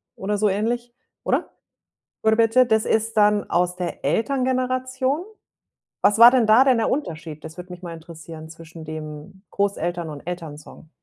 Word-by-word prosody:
oder 205 +2 -2
so 210 0 +2
ähnlich, 235 +4 -2 0.3
oder? - - 0 0.7
„Gurbetçi.“ 225 +3 +4
Das 220 -1 +2
ist 225 +1 0
dann 210 -1 +3
aus 180 +1 0
der 180 -1 -5
Elterngeneration? 255 +3 0 0.8
Was 205 +2 +3
war 235 +1 +10
denn 250 -4 +3
da 225 +5 +6
denn 255 -3 +3
der 225 - +1
Unterschied? 160 - -4
Das 160 +2 -9
würde 180 0 -9
mich 180 0 -10
mal 170 -2 -7
interessieren. 160 -1 -11
Zwischen 165 0 -12
dem 155 +4 -9
Großeltern 175 -4 -2
und 145 -2 -8
Elternsong. 160 -3 -8
200 Hz, 150 wpm, -22 LUFS, 165-235 Hz, 0.8 s, war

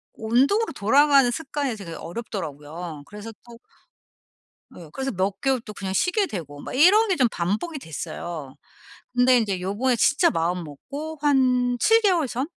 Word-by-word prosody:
운동으로 270 - +1
돌아가는 275 +4 +4
습관이 280 -2 -3
되게 180 -5 -8
어렵더라고요. 165 -5 -7
그래서 210 +2 -9
또 235 -1 -13 1.2
예. 170 -3 -11
그래서 270 0 -3
몇 190 +1 -2
개월 270 -2 +1
또 210 - -9
그냥 195 -2 -5
쉬게 385 - +1
되고 145 - -7
막 - - -8
이런 395 +11 +5
게 375 - +1
좀 255 -5 +4
반복이 210 - -2
됐어요. 160 - -7 0.6
근데 250 0 +5
인제 200 -5 -1
요번에 215 +7 0
진짜 290 +8 +3
마음먹고 180 - -4
한 250 -4 +2
7 450 - +5
개월 355 -9 +2
전? 255 +4 -2
240 Hz, 310 characters per minute, -24 LUFS, 180-285 Hz, 1.2 s, 이런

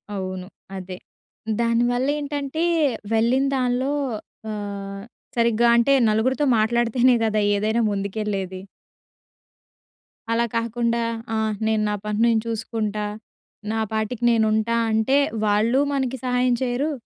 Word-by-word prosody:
అవును. 185 -1 -5 0.3
అదే. 185 -1 -7 0.6
దాని 230 0 +2
వల్లేంటంటే, 285 +3 -1 0.5
వెళ్ళిన 240 +5 +3
దాన్లో 255 +1 0 0.6
ఆహ్, 200 -1 -6 0.3
సరిగ్గా 235 0 +3
అంటే, 255 +4 +4 0.2
నలుగురుతో 260 +7 +1
మాట్లాడితేనే 240 +3 +3
గదా 215 -1 +1
ఏదైనా 220 +3 +1
ముందుకెళ్ళేది. 195 -2 -3 1.7
అలా 235 +1 +2
కాకుండా, 235 0 0 0.3
ఆ! - - 0 0.3
నేను 220 -1 +1
నా 210 - 0
పని 210 0 -2
నేను 225 -2 +3
చూసుకుంటా, 215 -2 -2 0.7
నా 225 - -1
పాటికి 220 +2 -2
నేనుంటా 220 0 +2 0.2
అంటే, 220 +6 +2 0.3
వాళ్ళూ 220 +6 +3
మనకి 265 -1 -1
సహాయం 250 0 +2
చెయరు. 260 +5 -1
230 Hz, 105 wpm, -23 LUFS, 210-250 Hz, 1.7 s, అంటే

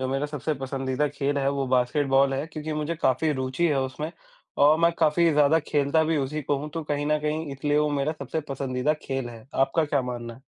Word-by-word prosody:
जो 130 - -1
मेरा 135 +2 -1
सबसे 150 +1 -3
पसंदीदा 135 +1 -2
खेल 140 0 -1
है, 135 - +1
वो 140 -1 -1
बास्केटबॉल 135 +2 +2
है, 140 +4 -2
क्योंकि 155 0 -5
मुझे 150 +2 -2
काफ़ी 150 +1 +1
रुचि 130 +4 -1
है 140 -3 +1
उसमें 140 +5 -4 0.5
और 155 +2 +6
मैं 170 0 +4
काफ़ी 165 +1 +4
ज़्यादा 150 +2 +4
खेलता 145 +2 +2
भी 160 0 +1
उसी 150 +2 -2
को 140 +1 0
हूँ, 150 +2 -5
तो 165 +1 -4
कहीं 145 0 -2
न 150 0 +2
कहीं 155 +1 -2
इसलिए 145 +2 0
वो 150 0 +2
मेरा 145 +1 0
सबसे 140 +3 -3
पसंदीदा 135 +1 -1
खेल 135 -2 -3
है। 115 -1 -11
आपका 155 +4 +2
क्या 145 -3 0
मानना 120 -2 -5
है? 130 - -18
145 Hz, 220 wpm, -26 LUFS, 135-150 Hz, 0.5 s, और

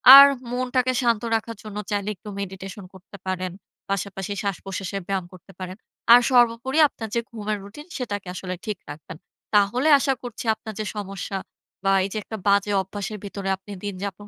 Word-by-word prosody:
আর 280 0 +13 0.3
মনটাকে 255 0 +1
শান্ত 235 -3 +2
রাখার 225 +1 -3
জন্য 210 -1 -7
চাইলে 205 0 0
একটু 210 +3 -10
মেডিটেশন 195 0 -6
করতে 190 +2 -13
পারেন, 185 -1 -1 0.4
পাশাপাশি 195 0 -2
শ্বাসপ্রশ্বাসের 195 0 -3
ব্যায়াম 195 -2 -1
করতে 185 +2 -14
পারেন। 185 0 -6 0.4
আর 245 - +9
সর্বোপরি 245 +4 +4
আপনার 225 -5 -7
যে 235 - +3
ঘুমের 215 -2 -2
রুটিন, 225 +10 -10
সেটাকে 205 -6 -4
আসলে 185 0 -4
ঠিক 210 -3 -2
রাখবেন। 155 +2 -8 0.4
তাহলে 230 +8 +4
আশা 270 - +2
করছি 240 -1 -6
আপনার 220 0 -8
যে 215 - -1
সমস্যা, 195 -1 -4 0.5
বা 195 0 +4
এই - - -4
যে 215 - -2
একটা 220 - -6
বাজে 200 +1 +4
অভ্যাসের 205 +2 -5
ভিতরে 195 -1 -4
আপনি 200 +2 -13
দিনযাপন 200 +1 -5
205 Hz, 170 wpm, -24 LUFS, 195-230 Hz, 0.5 s, আর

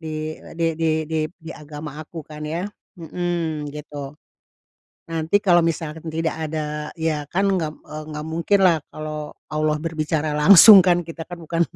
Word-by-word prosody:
Di 155 -1 -5
e - - -13
di 165 -1 +1
di 160 -1 +2
di 160 0 -2
di 165 -2 -12
agama 150 0 -8
aku 155 0 -9
kan 150 -1 -11
yah. 165 +5 -3 0.3
Mhm, 165 -3 -3
gitu. 145 -1 -8 0.9
Nanti 165 +3 +1
kalau 175 -3 +5
misalkan 160 -1 -3
tidak 160 +1 -1
ada 150 -1 -4
ya 155 -3 -1
kan 195 +3 +1
nggak, 165 -5 0
eee, 155 0 -7
nggak 150 0 -5
mungkinlah 170 +2 +3
kalau 155 -1 -6 0.2
Allah 155 0 +1
berbicara 155 -1 -2
langsung 195 +6 +10
kan, 175 -1 +3
kita 165 -1 -7
kan 175 -1 -8
bukan 165 +1 -2
160 Hz, 160 wpm, -22 LUFS, 150-170 Hz, 0.9 s, langsung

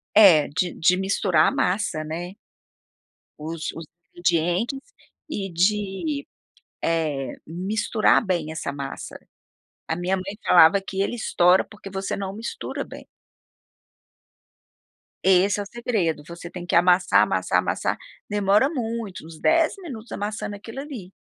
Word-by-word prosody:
É. 185 -9 +8
De 175 +5 -1
de 180 +3 +4
misturar 190 -3 +2
a - - +2
massa, 180 -4 0
né. 170 +4 -5 1.1
Os 160 +1 -4
os 165 0 -8 0.3
ingredientes. 175 - +1 0.5
E 200 -10 -3
de, 210 - 0 0.5
eh, 155 -5 -1
misturar 205 +7 +1
bem 170 -5 -1
essa 160 -3 -4
massa. 140 -1 -7 0.7
A 160 - -1
minha 180 +3 -1
mãe 190 +2 -5
falava 175 +3 +7
que 195 0 -5
ele 200 - -1
estoura, 180 -5 +3
porque 205 -2 -12
você 190 0 -3
não 195 -1 -4
mistura 225 +2 -5
bem. - - -11 2.2
Esse 190 +2 +4
é - - -2
o - - -11
segredo. 200 -10 -1
Você 170 0 -8
tem 180 -1 -7
que - - -1
amassar, 180 +1 +5
amassar, - - +1
amassar. - - -1 0.3
Demora 205 +5 +3
muito, 230 - -4
uns 160 -1 -11
10 330 -1 +3
minutos 255 - -9
amassando 205 0 -4
aquilo 225 +6 -8
ali. 245 -11 -8
190 Hz, 135 wpm, -24 LUFS, 170-210 Hz, 2.2 s, É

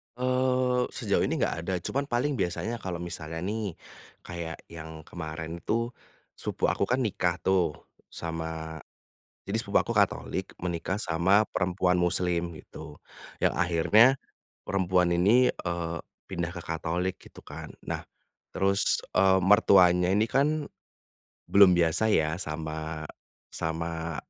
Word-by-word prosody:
Eee, 125 0 +1
sejauh - - +1
ini - - -1
enggak - - +1
ada 95 - -1
cuman 140 +1 -2
paling 125 0 0
biasanya 110 +6 -2
kalau 90 -3 -4
misalnya 80 -1 -6
nih, 105 -3 -3 0.5
kayak 85 -2 -6
yang 80 -1 -9
kemarin 80 0 -6
tuh, 115 +2 0 0.5
sepupu - - -1
aku 100 - 0
kan 130 +2 +1
nikah 90 -6 0
tuh 90 -5 +2 0.3
sama 80 -1 -5 0.6
jadi - - -2
sepupu - - +2
aku - - -3
Katolik - - 0
menikah 85 +1 -2
sama 95 +2 +3
perempuan 90 0 +1
Muslim, 85 -1 0
gitu, 75 - -11 0.4
yang - - +4
akhirnya, 90 +9 +5 0.5
perempuan 90 -2 +2
ini, 110 +9 +5
eee, 85 -1 -3 0.3
pindah 85 -3 -3
ke 85 - -7
Katolik 85 +3 -2
gitu - - -16
kan, - - -9
nah, - - -5 0.5
terus, 100 +1 +2 0.2
eee, 95 0 +5
mertuanya 90 -2 +5
ini 105 +3 +3
kan, 145 +4 +1 0.8
belum 95 -3 +6
biasa 85 +6 +2
ya 80 -4 +2
sama 80 -1 -4 0.5
sama 80 0 -3
90 Hz, 125 wpm, -28 LUFS, 80-105 Hz, 0.8 s, belum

